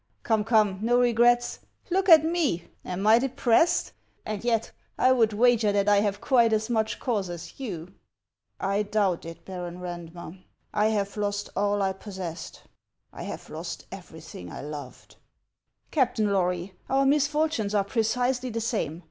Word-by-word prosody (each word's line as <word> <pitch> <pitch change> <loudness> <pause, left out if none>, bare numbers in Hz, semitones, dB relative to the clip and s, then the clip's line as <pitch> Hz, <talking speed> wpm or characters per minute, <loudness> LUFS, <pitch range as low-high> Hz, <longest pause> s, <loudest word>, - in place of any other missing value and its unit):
" - - -44
Come, 220 -2 +1
come, 210 -4 +2
no 240 +2 +3
regrets! 240 0 +3 0.3
Look 385 +2 +1
at 315 -2 +9
me. 320 - 0 0.2
Am 185 +2 -4
I 220 +2 +7
de 270 +2 -1
pressed? 265 +7 +2 0.3
And 215 -1 -4
yet 230 -2 0 0.3
I 255 - +4
would 230 -4 +3
wager 225 -1 +3
that 200 0 +1
I 205 0 +5
have 205 -1 0
quite 235 -3 +3
as 220 +2 0
much 220 -2 0
cause 210 -8 -1
as 175 +6 -8
you." 185 -10 -5 0.4
" - - -54
I 205 - +2
doubt 200 -5 0
it, 165 0 -10
Baron 180 -2 -6
Eandmer; 175 0 -8 0.3
I 210 +1 +3
have 205 -2 -1
lost 205 0 -2
all 205 0 +1
I 190 0 0
pos 195 0 -10
sessed; 170 -3 -6 0.5
I - - -9
have - - -7
lost - - -6
everything 90 -1 -10
I - - -7
loved." 145 -3 -9 0.4
" - - -47
Captain 235 -8 +1
Lory, 180 0 -1 0.2
our 270 +1 +3
misfortunes 290 -6 +1
are 200 - +3
precisely 245 +4 0
the 230 -1 -3
same. 215 - -2
215 Hz, 170 wpm, -26 LUFS, 190-245 Hz, 0.5 s, at